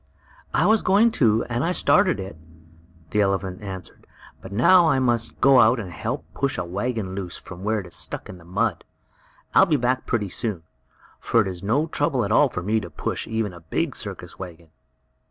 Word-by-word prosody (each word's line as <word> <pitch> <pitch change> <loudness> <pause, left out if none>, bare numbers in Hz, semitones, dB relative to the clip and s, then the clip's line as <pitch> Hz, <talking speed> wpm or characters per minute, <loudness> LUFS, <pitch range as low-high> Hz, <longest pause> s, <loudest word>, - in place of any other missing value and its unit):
"I - - +2
was 220 0 +4
going 210 +5 +4
to, 115 -1 +4
and 120 +2 -2
I 170 - +1
started 185 - +3
it," 95 -3 -6 0.8
the 105 - +2
elephant 95 -1 -1
answered, 95 -4 -9 0.3
"but - - -10
now 165 - +5
I 140 - +3
must 120 -3 0
go 135 0 +6
out 115 +2 +5
and 95 -5 -6
help 115 - -4
push 140 -1 -1
a 90 - -2
wagon 100 +2 -3
loose 95 -3 -5
from 95 0 -11
where 105 0 0
it - - -12
is 85 - -12
stuck - - -3
in 90 - -10
the - - -16
mud. 95 +7 -1 0.7
I'll - - +6
be 155 -4 +2
back 125 0 -1
pretty 105 -5 -1
soon, 100 -4 -3 0.6
for 115 - +2
it 100 - -1
is 90 -2 -6
no 125 +10 +1
trouble 145 -6 0
at 100 - -3
all 140 +5 +5
for 90 - -5
me 110 +4 +1
to 90 -5 -8
push - - -3
even 110 -4 -2
a 85 - -11
big 80 -1 -2
circus - - -7
wagon." 85 -3 -9
110 Hz, 205 wpm, -23 LUFS, 95-130 Hz, 0.8 s, go